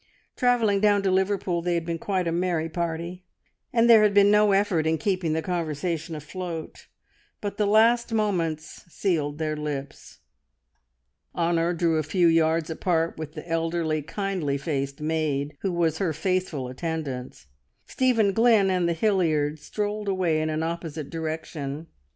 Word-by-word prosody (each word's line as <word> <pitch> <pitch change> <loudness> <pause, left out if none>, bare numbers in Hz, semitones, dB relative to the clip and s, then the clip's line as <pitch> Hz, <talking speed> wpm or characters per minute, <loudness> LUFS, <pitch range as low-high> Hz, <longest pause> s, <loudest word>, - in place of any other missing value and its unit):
Travelling 235 -5 +2
down 205 -1 +3
to 190 - +2
Liverpool 190 -2 0
they 175 0 0
had 170 -1 -2
been 165 -1 -3
quite 185 -2 -1
a - - 0
merry 170 -2 0
party, 170 +2 -4 0.5
and 235 -2 +3
there 230 -2 +8
had 210 -1 +3
been 200 0 +6
no 210 0 +5
effort 195 -5 +2
in 160 0 +2
keeping 180 -1 -1
the 160 0 -1
conversation 165 -1 -3
afloat; 165 +2 -7 0.5
but 205 -1 -5
the 210 - +1
last 230 +3 +4
moments 170 -8 -1
sealed 150 -7 -1
their 155 -1 -2
lips. 145 -2 -6 1.2
Honor 170 0 +1
drew 170 -2 +1
a - - +2
few 175 +4 +1
yards 165 -1 +3
apart 165 -1 -1
with 155 -1 -6
the 160 +1 -9
elderly, 165 -1 -1
kindly 180 -4 -2
faced 140 -1 -3
maid 150 -2 -1
who 195 - -1
was 165 -2 0
her 175 -5 0
faithful 180 -5 -1
attendant; 130 - -5 0.4
Stephen 230 -6 +2
Glynn 225 -3 +4
and 180 -2 +1
the - - +1
Hilliards 160 -6 +1
strolled 210 +2 -3
away 180 -5 +1
in 155 - -1
an 155 +1 -1
opposite 165 -3 -5
direction. 160 -2 -5
170 Hz, 155 wpm, -25 LUFS, 155-195 Hz, 1.2 s, there